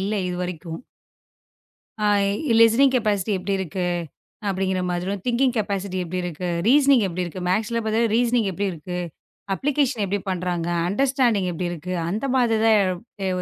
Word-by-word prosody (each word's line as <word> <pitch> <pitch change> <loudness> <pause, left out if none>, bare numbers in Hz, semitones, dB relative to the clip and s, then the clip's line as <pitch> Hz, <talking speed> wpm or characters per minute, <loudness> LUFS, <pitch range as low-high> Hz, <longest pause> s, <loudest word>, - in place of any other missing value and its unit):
இல்ல 200 +3 -1
இதுவரைக்கும். 180 -1 -5 1.2
அ, 210 - -2 0.6
listening 245 +4 +6
capacity 210 -3 0
எப்படி 195 +2 -2
இருக்கு 180 0 -3 0.6
அப்படிங்கிற 190 -1 0
மாதிரியும், 185 +3 -2
திங்க்கிங்க் 250 0 +1
கெப்பாசிட்டி 200 -2 -2
எப்படி 180 +2 -4
இருக்கு? 175 +1 -4 0.2
ரீசனிங் 275 -3 +5
எப்படி 180 +1 -3
இருக்கு? 175 +2 -7
மேக்ஸ்ல 220 +4 0
பாத்தவே 225 +2 +2
ரீசனிங் 240 -3 +2
எப்படி 200 +3 -2
இருக்கு? 180 +3 -6 0.6
அப்ளிகேஷன் 275 -3 0
எப்படி 200 +1 -1
பண்றாங்க? 175 -2 -2 0.2
அண்டர்ஸ்டேன்டிங்க் 240 -4 +1
எப்படி 175 +2 -3
இருக்கு? 175 +2 -5 0.2
அந்த 215 +8 -2
மாதிரி 235 -4 +3
தான் 220 -1 +6
எதா 190 +1 -3
எ - - +1
200 Hz, 145 wpm, -23 LUFS, 180-230 Hz, 1.2 s, listening